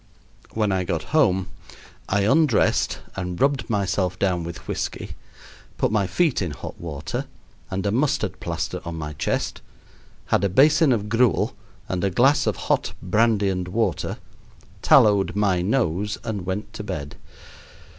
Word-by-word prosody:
When 105 -2 +1
I 95 -1 +1
got 85 -3 -2
home 95 - +3 0.6
I 100 +1 +2
undressed 135 +3 +3 0.2
and 90 -2 -4
rubbed 140 -2 +1
myself 95 -3 0
down 90 -3 0
with 85 0 -8
whisky, - - -4 0.7
put - - +1
my 105 -3 +1
feet 155 - +1
in 90 - -1
hot 75 - -8
water 75 -4 -4 0.4
and 95 +1 -3
a 100 - +1
mustard 135 +6 0
plaster - - -3
on 85 0 -5
my 75 -2 -5
chest, - - -2 0.7
had - - +3
a 100 - +2
basin 150 - +5
of 105 -4 0
gruel 115 -1 +2 0.3
and 95 0 -2
a 100 - +2
glass 135 +10 +3
of - - +1
hot - - 0
brandy 105 +1 +2
and 90 -1 -2
water, 100 -1 -1 0.6
tallowed 100 -3 +5
my 100 -4 +2
nose, 105 -1 0
and 105 -6 -4
went 95 +3 -4
to 105 - -6
bed. 75 -7 -5
100 Hz, 150 wpm, -23 LUFS, 90-115 Hz, 0.7 s, basin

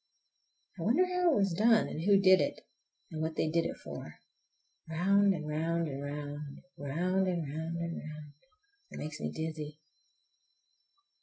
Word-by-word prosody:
I - - -4
wonder 245 - +4
how 360 -2 +2
it - - +2
was 195 -3 +2
done 220 +4 +4
and 155 - -5
who 195 +2 +5
did 190 -1 +6
it, - - -2 0.5
and 155 -1 -4
what 160 0 -2
they 155 - +1
did 165 0 +2
it - - -3
for. - - -8 0.7
Round 195 +5 +4
and 155 -5 -3
round 165 +2 0
and 140 -1 -5
round—round 150 +5 -3
and 175 -3 0
round 160 +3 -4
and 170 0 -3
round—it 265 - -13
makes 150 0 -5
me - - -2
dizzy! 155 -2 -5
165 Hz, 150 wpm, -32 LUFS, 150-195 Hz, 0.7 s, did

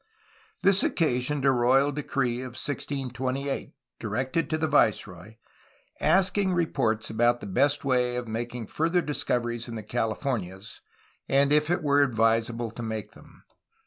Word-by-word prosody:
This 195 0 +5
occasioned 140 -2 0
a 135 - +6
royal 130 +3 +3
decree 135 -4 -1
of 130 -1 -7
1628, 135 -1 -3 0.2
directed 130 - -2
to 155 - 0
the 160 - 0
viceroy, 105 - +1 0.6
asking 190 0 +2
reports 115 -11 0
about 120 +2 +2
the - - -8
best 145 +10 +1
way 125 -2 +1
of 125 -1 -4
making 120 +1 -4
fiu 160 +9 -1
ther 175 -1 +2
discov 140 -4 -1
eries 120 0 -4
in 115 - -6
the 110 - -6
Californias 110 -3 -3 0.5
and 140 +1 +4
if 150 +1 +3
it 175 -1 0
were 145 -1 +4
advisable 115 -2 +1
to 120 - -8
make 110 -2 -4
them. - - -18
125 Hz, 145 wpm, -27 LUFS, 115-145 Hz, 0.6 s, a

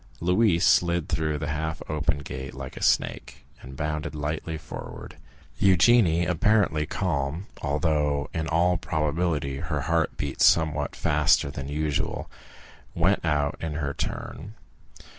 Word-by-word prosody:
Louise 90 0 +3
slid 85 -2 +3
through 80 -1 -1
the 75 0 -4
half 80 +1 -2
open 75 -2 0
gate 65 -2 -7
like 65 -1 -7
a - - -8
snake, - - 0 0.2
and 65 +1 -10
bounded 75 0 -3
lightly 75 +2 -3
forward. 75 -1 -9 0.5
Eugénie, 95 -3 +5
apparently 90 -4 +2
calm, 80 -1 -2 0.2
although 75 -1 0
in 80 -1 -2
all 85 +2 +2
probability 75 -2 -1
her - - -3
heart 85 -1 0
beat 70 -2 -4
somewhat 75 -3 +3
faster 75 -1 +2
than 70 -1 -6
usual, 75 0 -2 0.6
went 90 +4 +2
out 75 -2 +1
in 80 -2 -3
her 70 -2 -2
turn. 95 - -5
75 Hz, 130 wpm, -26 LUFS, 75-85 Hz, 0.6 s, Eugénie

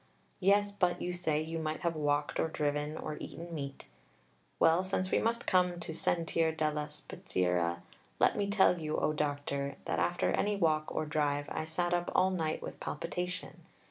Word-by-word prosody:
Yes, 200 +2 +4
but, 180 -3 +1
you 180 - -2
say, 160 -4 0
you 165 +1 -4
might 155 0 -2
have 170 -2 0
walked 145 -1 0
or - - +2
driven 150 0 -1
or 150 - -4
eaten 170 +1 -7
meat. 140 -3 -5 0.7
Well, 165 +3 +5
since 185 0 -1
we - - +4
must 235 +1 0
come 180 -2 +3
to 170 0 -5
sentir 165 0 +1
della 150 -1 0
spezieria, 90 - -1 0.3
let - - +4
me 200 -1 0
tell 190 -4 +4
you, 155 0 -1
O 155 - +1
Doctor, 145 -2 -2
that - - 0
after 175 - +1
any 205 +1 +1
walk 155 -5 +2
or - - -2
drive 145 -1 0
I 155 - -2
sat 175 +2 -1
up 175 0 0
all 190 +1 +4
night 160 -4 -1
with - - -7
palpitation. 180 +4 -4
160 Hz, 175 wpm, -32 LUFS, 150-180 Hz, 0.7 s, Well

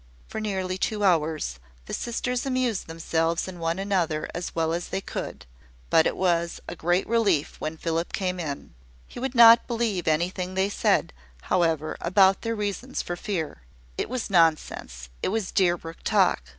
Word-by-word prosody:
For 220 - -5
nearly 190 -3 -2
two 210 0 -1
hours, 155 - +1 0.3
the - - -7
sisters 245 +1 -2
amused 255 -6 -1
themselves 165 +1 -1
and 180 -2 -8
one 165 +1 -1
another 180 -6 0
as 175 - -5
well 165 -1 +1
as 175 +1 -3
they - - -2
could: - - -6 0.5
but 160 - +5
it - - -2
was 170 -2 +1
a - - -5
great 175 +3 +1
relief 205 -10 +1
when 155 +1 -3
Philip 165 +1 -2
came 185 -2 -2
in. 145 -4 -5 0.3
He - - -9
would 265 +1 -3
not 230 0 +8
believe 225 -7 -1
anything 180 +4 0
they 190 +1 +2
said, - - +1 0.4
however, 165 -3 +1
about 190 +2 +4
their 230 0 -2
reasons 210 +5 -3
for 175 - -4
fear. 175 - -4 0.3
It - - -3
was 250 -2 -2
nonsense 155 - +1
it - - 0
was 215 -1 -2
Deerbrook 175 -3 0
talk. - - +2
180 Hz, 165 wpm, -26 LUFS, 165-205 Hz, 0.5 s, not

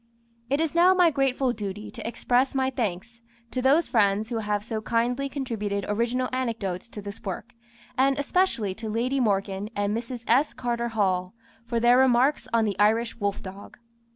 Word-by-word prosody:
It 280 +2 +1
is 320 -2 0
now 355 +2 +5
my 355 -3 +5
grateful 270 -2 +1
duty 210 -1 -6
to 230 -3 -7
express 245 +3 +1
my 265 0 +1
thanks 230 -1 -4 0.3
to 255 - -2
those 280 +6 +4
friends 210 -1 +2
who 235 -2 -2
have 210 -1 -1
so 220 -1 -4
kindly 245 +5 0
contributed 215 -8 -3
original 235 +4 0
anecdotes 230 -6 -3
to 210 -3 -9
this 200 0 -8
work, 205 +4 -6 0.5
and 270 +1 +3
especially 280 - +1
to 220 +2 -6
Lady 245 +5 0
Morgan 200 -3 0
and 205 +1 0
Mrs. 235 +1 -5
S. 270 +6 +2
Carter 235 -1 -2
Hall 190 -4 0 0.3
for 235 -1 0
their 240 +2 +5
remarks 260 +2 +3
on 230 -1 +3
the 205 -2 -2
Irish 225 +3 +2
wolf 200 -1 -2
dog. 195 +1 -10
230 Hz, 175 wpm, -26 LUFS, 205-260 Hz, 0.5 s, now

